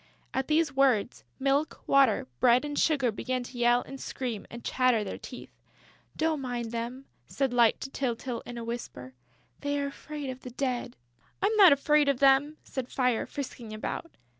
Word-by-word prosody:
At 265 0 -1
these 305 -3 +2
words, 255 -5 +2
Milk, 275 +3 0
Water, 270 - +4
Bread 250 +3 +4
and 290 0 -4
Sugar 275 -7 +2
began 255 +4 -3
to 245 +1 -10
yell 240 +1 +4
and 270 0 -9
scream 240 -6 -4
and 235 0 -9
chatter 250 -4 +2
their 195 - -6
teeth. - - -10 0.7
"Don't 315 -2 0
mind 240 -3 -3
them," 240 +3 -5 0.2
said 270 -3 -1
Light 235 -2 +4
to 270 - -6
Tyltyl, 245 -2 -3
in 240 - -7
a 235 - -5
whisper. 230 - -6 0.5
"They 285 0 -1
are 285 - -1
afraid 285 0 -6
of 255 - -9
the 255 - -9
Dead." 250 -1 -3 0.4
"I'm 410 +3 +1
not 390 -6 +8
afraid 290 +1 +4
of 280 - +2
them!" 275 +3 +4
said 260 -2 -5
Fire, 250 -3 0
frisking 245 -5 -6
about. 275 +9 -4
260 Hz, 175 wpm, -29 LUFS, 240-280 Hz, 0.7 s, not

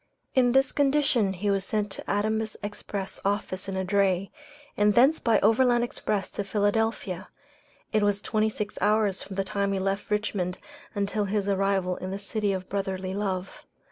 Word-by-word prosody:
In 245 -2 +4
this 270 0 +4
condition 275 -7 +2
he 200 +2 -1
was 195 -1 +1
sent 210 0 -1
to - - -7
Adams' 215 +1 0
Express 205 -1 -5
office 195 -1 -1
in 195 - -3
a 190 - -1
dray, 195 -1 +1 0.4
and 210 0 +3
thence 275 +6 +5
by 225 -3 +3
overland 240 +3 +4
express 210 -4 -2
to 205 - -3
Philadelphia. 205 -2 0 0.7
It 215 - +3
was 205 -1 +2
twenty 215 +1 +1
six 210 -1 -5
hours 210 -2 +2
from 195 - -7
the 195 - 0
time 200 +1 -1
he 195 - 0
left 195 +1 -2
Richmond 205 -4 -1 0.4
until 205 +1 0
his 200 0 -1
arrival 195 -2 +1
in 185 - -5
the 195 - -3
City 205 +1 -1
of 185 -1 -3
Brotherly 190 -1 -3
Love. 190 -2 -3
205 Hz, 170 wpm, -27 LUFS, 195-215 Hz, 0.7 s, thence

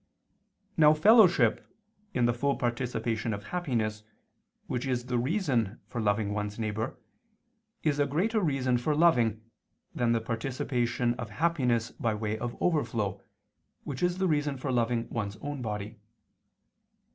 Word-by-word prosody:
Now 155 -1 +7
fellowship 205 +2 +5 0.5
in 125 -1 +1
the 120 - +3
full 140 +4 0
participation 115 -2 -1
of 100 - -9
happiness 115 - -2 0.6
which 125 +1 -3
is 125 -2 -1
the 125 -1 0
reason 125 - 0
for 120 - -4
loving 105 -1 +1
one's 105 0 -3
neighbor, 110 +2 -3 0.9
is 145 -2 +1
a 145 - +3
greater 205 - +1
reason 130 -7 +1
for 150 +5 0
loving, 120 - +3 0.5
than 120 -1 +1
the 115 - +3
participation 120 +1 -1
of 115 -3 -4
happiness 125 -3 0
by 115 -2 -1
way 105 0 -2
of 120 +2 -5
overflow, 110 - 0 0.6
which 130 -3 -5
is 175 0 +1
the 190 0 +1
reason 145 -3 0
for 130 +1 -3
loving 120 -1 0
one's 105 -3 -3
own 145 -2 -5
body. 105 -1 -5
120 Hz, 140 wpm, -29 LUFS, 110-145 Hz, 0.9 s, Now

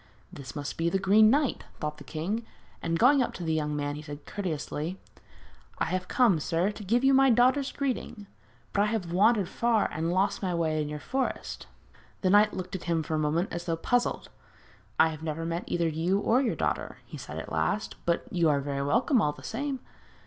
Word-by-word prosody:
'This 140 0 -9
must 145 -1 -5
be 165 +1 +2
the 195 - +1
Green 205 +3 +5
Knight,' 280 +2 +1 0.2
thought 150 0 -4
the - - -10
king; 195 +9 -3 0.4
and 165 0 0
going 265 +6 +5
up 245 - -1
to 180 - -6
the 160 -1 0
young 150 -1 -1
man 145 0 -2
he 150 - -6
said 145 -1 -9
courteously: 170 -2 -4 0.8
'I - - 0
have 185 0 -2
come, 230 -10 +3
sir, 170 +6 0
to 210 0 -9
give 235 +6 +1
you 270 0 +5
my 270 0 +6
daughter's 255 +4 +3
greeting. 255 -6 -3 0.5
But 200 - +2
I - - +4
have 205 -6 -2
wandered 205 +1 +4
far, 230 +2 +1
and 160 +2 -1
lost 190 +3 +1
my 185 -3 -1
way 160 -2 0
in 150 - -3
your 150 - -4
forest.' 260 - -3 0.5
The 185 - +2
knight 210 +1 +6
looked 185 0 -5
at 185 - -6
him 165 -2 0
for 155 - -4
a 155 - +1
moment 155 +5 0
as 170 0 -4
though 165 -1 0
puzzled. 245 +8 0 0.7
'I 160 - +6
have 155 -1 -7
never 160 0 -3
met 170 +2 -3
either 170 -1 0
you 165 +5 +1
or 230 +5 +3
your 250 - 0
daughter,' - - -2
he - - -9
said - - -7
at - - -6
last; 210 - -1
'but 170 - +1
you 170 -3 +3
are 145 -1 +3
very 140 0 -3
welcome 230 - +2
all 150 - +1
the - - -14
same.' 270 +3 -3
180 Hz, 215 wpm, -28 LUFS, 155-225 Hz, 0.8 s, my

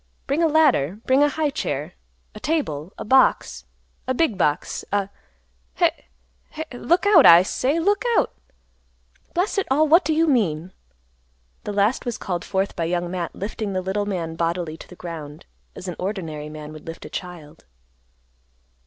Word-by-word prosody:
Bring 280 +4 0
a 330 - +4
ladder. 270 - +3
Bring 260 +2 +4
a 290 - +5
high 305 0 -1
chair, 145 - -3 0.4
a - - -9
table, 190 - -2
a - - -6
box, 260 +4 +3 0.4
a 260 - 0
big 285 -7 +2
box, 150 -3 -1
a—heh—heh—Look 65 - -3
out, 390 -8 +7
I 170 +1 +9
say, 275 - 0
look 405 +5 +1
out! - - +1 1.0
Blast 370 +3 +1
it 395 - -2
all, 300 +4 +3
what 335 +5 +6
do - - -1
you 325 +1 +3
mean?" 185 - 0 0.9
This 205 - -4
last 205 +5 +2
was 240 -3 -3
called 175 -3 -3
forth 195 0 -1
by 165 - -1
Young 175 +1 -2
Matt 180 -2 -4
lifting 205 0 -4
the 185 - -1
little 200 +2 -2
man 170 -5 -3
bodily 170 -1 -2
to - - -12
the 180 - -13
ground, 160 -4 -8 0.3
as 190 - -8
an 180 - -4
ordinary 165 -6 -4
man 150 0 -9
would 155 +1 -12
lift 165 - -8
a - - -6
child. 165 -4 -8
190 Hz, 160 wpm, -23 LUFS, 160-275 Hz, 1.0 s, I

